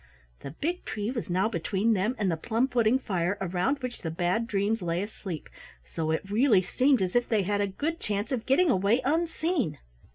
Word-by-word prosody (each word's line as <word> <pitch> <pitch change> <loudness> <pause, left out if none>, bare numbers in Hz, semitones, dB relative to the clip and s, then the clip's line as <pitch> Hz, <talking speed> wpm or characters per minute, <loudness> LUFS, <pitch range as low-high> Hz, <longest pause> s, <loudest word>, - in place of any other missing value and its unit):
The - - -7
big 330 - -3
tree 210 +2 -3
was 235 -6 -4
now 185 +4 +2
between 205 +2 0
them 210 +5 0
and 200 -4 +1
the - - +1
plum 225 +9 0
pudding 240 -1 +3
fire 185 -6 -1
around 190 +10 -1
which 250 -1 -5
the 165 - -3
Bad 180 +7 0
Dreams 210 +1 0
lay 175 +1 -1
asleep, 195 -5 -7 0.4
so 160 - -3
it 160 +4 -1
really 210 -1 +4
seemed 255 +4 +2
as 180 +3 -3
if 245 0 +2
they 215 -3 +2
had 205 +2 0
a 200 - +1
good 300 - -3
chance 205 +2 -2
of 245 -4 -2
getting 310 +5 +4
away 205 +4 +2
unseen. 320 - 0
210 Hz, 200 wpm, -28 LUFS, 185-255 Hz, 0.4 s, really